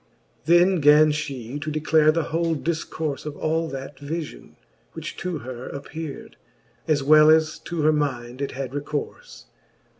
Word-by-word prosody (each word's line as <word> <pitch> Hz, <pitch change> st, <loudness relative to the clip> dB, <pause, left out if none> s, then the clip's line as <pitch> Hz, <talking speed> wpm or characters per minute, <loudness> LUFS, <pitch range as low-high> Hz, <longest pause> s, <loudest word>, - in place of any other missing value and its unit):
XX. -, -, -39 dB
Then 175 Hz, +2 st, +4 dB
gan 150 Hz, +1 st, +6 dB
fhe 140 Hz, -3 st, -5 dB
to 155 Hz, -, -3 dB
declare 155 Hz, 0 st, +3 dB
the 165 Hz, +1 st, 0 dB
whole 165 Hz, +1 st, -1 dB
difcourfe 155 Hz, -1 st, -3 dB
Of 150 Hz, -, -6 dB
all 160 Hz, +1 st, 0 dB
that 135 Hz, -1 st, -7 dB
vifion, 155 Hz, +2 st, -6 dB, 0.4 s
which -, -, -7 dB
to 175 Hz, -2 st, -3 dB
her 130 Hz, -1 st, -8 dB
appeard. 145 Hz, +1 st, -8 dB, 0.5 s
As 145 Hz, -3 st, +2 dB
well 155 Hz, +2 st, +7 dB
as 155 Hz, 0 st, +3 dB
to 170 Hz, -3 st, -3 dB
her 155 Hz, +1 st, +4 dB
minde 130 Hz, -4 st, -2 dB
it 140 Hz, -, -3 dB
had 135 Hz, -1 st, -5 dB
recourfe. 145 Hz, +1 st, -5 dB
150 Hz, 155 wpm, -24 LUFS, 140-160 Hz, 0.5 s, well